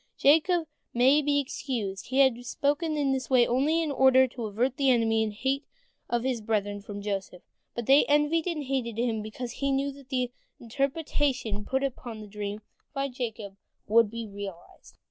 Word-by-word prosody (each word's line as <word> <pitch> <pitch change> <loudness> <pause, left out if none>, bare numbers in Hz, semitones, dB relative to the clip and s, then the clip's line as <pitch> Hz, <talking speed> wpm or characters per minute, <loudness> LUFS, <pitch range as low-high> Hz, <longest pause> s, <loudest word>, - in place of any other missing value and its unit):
" - - -49
Jacob 325 +4 +4 0.3
may 265 +5 +5
be 290 0 +2
excused, 230 -8 -4
he 260 - -2
had 250 -3 +3
spoken 295 +5 -1
in 280 -2 +1
this 260 -1 -2
way 250 -2 +5
only 290 +8 +2
in 310 - -2
order 260 -1 +5
to 240 -2 -6
avert 240 +5 0
the 275 -1 +3
envy 225 -3 +3
and 220 -1 0
hate 270 +6 -1 0.5
of 240 -1 0
his 255 -3 -1
brethren 205 -2 -1
from 205 0 -8
Joseph, 195 -3 -4 0.3
but 235 - -3
they 275 +4 +6
envied 295 +3 +2
and 325 -4 -2
hated 255 -4 -2
him 230 -2 0
because 235 +3 -7
they 275 - +1
knew 275 +1 0
that 275 -1 -15
the 250 -2 -1 0.3
interpretation 265 -4 -1
put 265 +1 0
upon 245 -4 -4
the 215 - -9
dream 205 0 -5 0.3
by 275 0 -1
Jacob 225 -6 -5 0.3
would 225 0 +4
be 230 +1 -5
realized. 200 -4 -10
250 Hz, 185 wpm, -28 LUFS, 220-275 Hz, 0.5 s, they